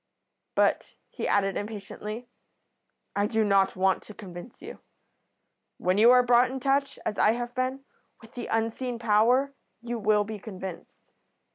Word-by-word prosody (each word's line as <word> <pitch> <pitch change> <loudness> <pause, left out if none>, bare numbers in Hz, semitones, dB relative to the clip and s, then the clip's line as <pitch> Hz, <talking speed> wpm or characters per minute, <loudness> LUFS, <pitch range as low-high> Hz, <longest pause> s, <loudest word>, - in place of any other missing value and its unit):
But," - - +1 0.2
he - - -4
added, 195 -1 +1
impatiently, 210 +2 -6 0.9
"I 205 0 +1
do 220 0 +1
not 195 -2 +3
want 190 0 +2
to 210 - -13
convince 185 +2 -10
you. - - -10 1.0
When 185 +2 +1
you 230 +2 +7
are 250 0 +7
brought 245 +1 +4
in 265 +1 -4
touch, 275 +1 0
as 210 - -2
I 215 - +5
have 240 +1 -4
been, 260 +2 -2 0.3
with 225 0 -17
the 240 - -6
unseen 230 +2 -1
power 235 +5 +3 0.3
you 240 0 -4
will 210 0 +3
be 215 0 -7
convinced. 190 -3 -9
225 Hz, 150 wpm, -27 LUFS, 205-245 Hz, 1.0 s, you